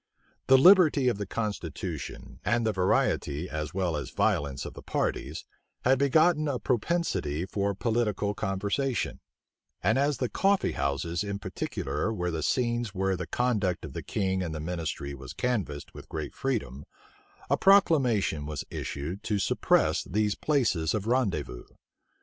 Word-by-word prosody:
The 135 Hz, -, +8 dB
liberty 155 Hz, -4 st, +6 dB
of 105 Hz, -, -2 dB
the 100 Hz, -, -3 dB
constitution, 90 Hz, -, -5 dB
and 120 Hz, -1 st, +1 dB
the 110 Hz, -, +1 dB
variety 90 Hz, -4 st, +1 dB
as 75 Hz, -2 st, -4 dB
well 90 Hz, -4 st, -1 dB
as 75 Hz, -, -4 dB
violence 70 Hz, -2 st, 0 dB
of -, -, -7 dB
the -, -, -10 dB
parties, -, -, -2 dB, 0.4 s
had 130 Hz, +1 st, +4 dB
begotten 155 Hz, +3 st, +4 dB
a 140 Hz, -3 st, 0 dB
propensity 110 Hz, -, -1 dB
for 100 Hz, +1 st, -1 dB
political 105 Hz, -2 st, 0 dB
conversation; 100 Hz, +7 st, -1 dB, 0.6 s
and 110 Hz, +7 st, +3 dB
as 140 Hz, -1 st, +2 dB
the 125 Hz, -, 0 dB
coffee 195 Hz, +8 st, +2 dB
houses 70 Hz, +6 st, -1 dB
in 100 Hz, -1 st, -3 dB
particular 105 Hz, +2 st, -3 dB
were 90 Hz, -5 st, -2 dB
the 80 Hz, -1 st, -2 dB
scenes 120 Hz, -, 0 dB
where 95 Hz, 0 st, +1 dB
the 90 Hz, -1 st, -5 dB
conduct 105 Hz, -9 st, 0 dB
of 70 Hz, -, -9 dB
the -, -, -4 dB
king 95 Hz, -2 st, -1 dB
and 85 Hz, -3 st, -3 dB
the -, -, -4 dB
ministry 80 Hz, -4 st, -4 dB
was 65 Hz, -2 st, -9 dB
canvassed 100 Hz, -, -2 dB
with -, -, -11 dB
great -, -, -5 dB
freedom, 105 Hz, -, -3 dB, 0.6 s
a -, -, +3 dB
proclamation 130 Hz, -, +3 dB
was 75 Hz, -2 st, -4 dB
issued 80 Hz, +8 st, -4 dB
to 105 Hz, -, -1 dB
suppress -, -, +2 dB
these 105 Hz, +2 st, 0 dB
places 110 Hz, -, +1 dB
of 105 Hz, -2 st, -2 dB
rendezvous. 95 Hz, -, -1 dB
100 Hz, 150 wpm, -28 LUFS, 80-125 Hz, 0.6 s, The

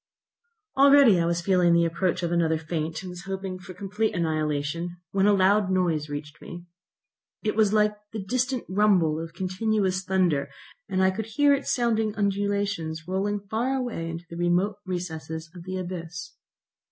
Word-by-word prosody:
Already 275 Hz, -7 st, +7 dB
I 170 Hz, -, +1 dB
was 170 Hz, 0 st, 0 dB
feeling 180 Hz, -2 st, +4 dB
the 170 Hz, 0 st, +4 dB
approach 170 Hz, +1 st, -1 dB
of 170 Hz, -, -1 dB
another 165 Hz, -2 st, +2 dB
faint, 160 Hz, +1 st, -4 dB
and 185 Hz, -, -6 dB
was 180 Hz, +1 st, -9 dB
hoping 190 Hz, -1 st, -4 dB
for 185 Hz, 0 st, -11 dB
complete 200 Hz, +4 st, -2 dB
annihilation, 155 Hz, +1 st, -1 dB
when 195 Hz, 0 st, +2 dB
a -, -, +6 dB
loud 195 Hz, +1 st, +3 dB
noise 170 Hz, -5 st, 0 dB
reached 145 Hz, 0 st, -7 dB
me. 175 Hz, 0 st, -9 dB, 0.8 s
It 215 Hz, -, 0 dB
was 215 Hz, -2 st, +3 dB
like 210 Hz, 0 st, +3 dB, 0.2 s
the 215 Hz, -3 st, -5 dB
distant 255 Hz, +3 st, -1 dB
rumble 185 Hz, -6 st, +3 dB
of 165 Hz, 0 st, -7 dB
continuous 190 Hz, 0 st, 0 dB
thunder, 180 Hz, -7 st, +1 dB, 0.4 s
and 190 Hz, -1 st, +1 dB
I 190 Hz, -, +4 dB
could 220 Hz, +3 st, -5 dB
hear 285 Hz, +6 st, +3 dB
its 280 Hz, 0 st, -1 dB
sounding 225 Hz, -4 st, +1 dB
undulations 200 Hz, -5 st, -1 dB
rolling 200 Hz, +2 st, -1 dB
far 225 Hz, +6 st, -1 dB
away 240 Hz, -11 st, -3 dB
into 165 Hz, +1 st, -6 dB
the 170 Hz, -, -9 dB
remote 175 Hz, +4 st, +1 dB
recesses 160 Hz, -2 st, -5 dB
of 175 Hz, -2 st, -11 dB
the 185 Hz, 0 st, -4 dB
abyss. 175 Hz, -2 st, -6 dB
185 Hz, 165 wpm, -26 LUFS, 170-205 Hz, 0.8 s, Already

